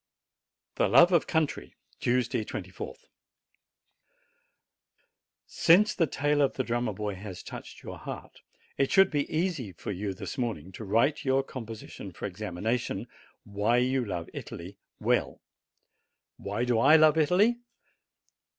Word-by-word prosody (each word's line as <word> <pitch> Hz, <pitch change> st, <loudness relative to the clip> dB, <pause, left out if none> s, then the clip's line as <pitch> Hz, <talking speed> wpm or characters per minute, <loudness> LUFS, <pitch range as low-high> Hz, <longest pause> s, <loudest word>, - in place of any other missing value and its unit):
THE -, -, +3 dB
LOVE 175 Hz, +2 st, +7 dB
OF 170 Hz, -3 st, +3 dB
COUNTRY 155 Hz, -, -1 dB, 0.2 s
Tuesday, 120 Hz, -2 st, +1 dB
24th. 95 Hz, -3 st, -7 dB, 2.4 s
Since 205 Hz, +6 st, +4 dB
the 165 Hz, -5 st, +1 dB
tale 145 Hz, +1 st, +1 dB
of 140 Hz, -, +2 dB
the 130 Hz, -, -1 dB
Drummer 120 Hz, -1 st, -1 dB
boy 105 Hz, +1 st, -3 dB
has 95 Hz, -1 st, -8 dB
touched -, -, -9 dB
your -, -, -8 dB
heart, -, -, -8 dB, 0.4 s
it 135 Hz, -, +2 dB
should 195 Hz, 0 st, +5 dB
be 145 Hz, -2 st, -1 dB
easy 155 Hz, -, -1 dB
for 85 Hz, -, -6 dB
you 100 Hz, 0 st, -3 dB
this 130 Hz, -, -6 dB
morning 105 Hz, -8 st, -3 dB
to 105 Hz, -, -8 dB
write 115 Hz, +11 st, +2 dB
your 135 Hz, -1 st, +2 dB
composition 115 Hz, -5 st, -8 dB
for -, -, -7 dB
examination 110 Hz, +3 st, -3 dB, 0.4 s
Why 105 Hz, +3 st, +1 dB
you 130 Hz, +1 st, +2 dB
love 90 Hz, -6 st, -4 dB
Italy 90 Hz, +3 st, -8 dB, 0.2 s
well. -, -, 0 dB, 1.0 s
Why 105 Hz, +5 st, -2 dB
do 120 Hz, -2 st, +2 dB
I 140 Hz, +6 st, +7 dB
love 155 Hz, -1 st, +6 dB
Italy 200 Hz, +10 st, +3 dB
125 Hz, 130 wpm, -28 LUFS, 105-150 Hz, 2.4 s, LOVE